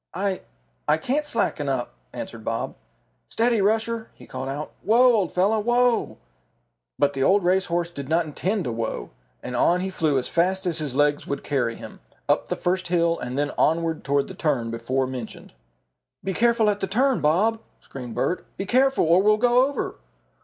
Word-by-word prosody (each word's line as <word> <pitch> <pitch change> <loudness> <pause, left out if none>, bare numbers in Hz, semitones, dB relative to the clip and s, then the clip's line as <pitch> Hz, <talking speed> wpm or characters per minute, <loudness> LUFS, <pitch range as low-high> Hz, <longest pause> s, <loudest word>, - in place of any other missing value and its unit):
"I 195 0 -1 0.5
I - - +4
can't 280 - -1
slacken 155 - -1
up," 130 - -2 0.2
answered - - -7
Bob. - - -2 0.6
"Steady, 230 -1 +2
Rusher," 225 +2 0
he - - -14
called 130 +1 -5
out. 145 +3 -5
"Whoa, 240 +4 +5
old 200 -6 +1
fellow, 200 +5 +2
whoa!" 240 +2 +1 0.8
But 145 0 +2
the 135 - -3
old 195 +7 +4
race 185 +2 +2
horse 170 0 -1
did 140 -4 -7
not 165 +1 +2
intend 185 +6 -2
to 125 - -3
whoa, 115 -1 -4 0.3
and 125 - -5
on 175 +8 +3
he 190 +1 -3
flew 155 -6 +1
as 125 - -1
fast 185 +3 +1
as 170 -3 0
his 145 -4 -3
legs 145 0 +2
would 140 - -3
carry 120 -5 -1
him, - - -11 0.3
up - - +1
the - - -1
first 185 +1 -1
hill 170 -1 +1
and 125 +2 -5
then 145 0 0
onward 165 0 +1
toward 140 0 +1
the 190 - -8
turn 140 -10 -1
before 130 +3 -1
mentioned. 125 -3 -7 0.7
"Be 190 - -2
careful 230 0 +3
at 205 - -4
the 195 - -2
turn, 255 +6 +2
Bob!" 205 +9 +2 0.2
screamed 125 -4 -9
Bert. 175 +8 -1
"Be 195 - -3
careful, 265 +2 +3
or 170 +3 +5
we'll 210 +1 +4
go 245 +3 +4
over!" 285 - -4
175 Hz, 190 wpm, -24 LUFS, 140-215 Hz, 0.8 s, Whoa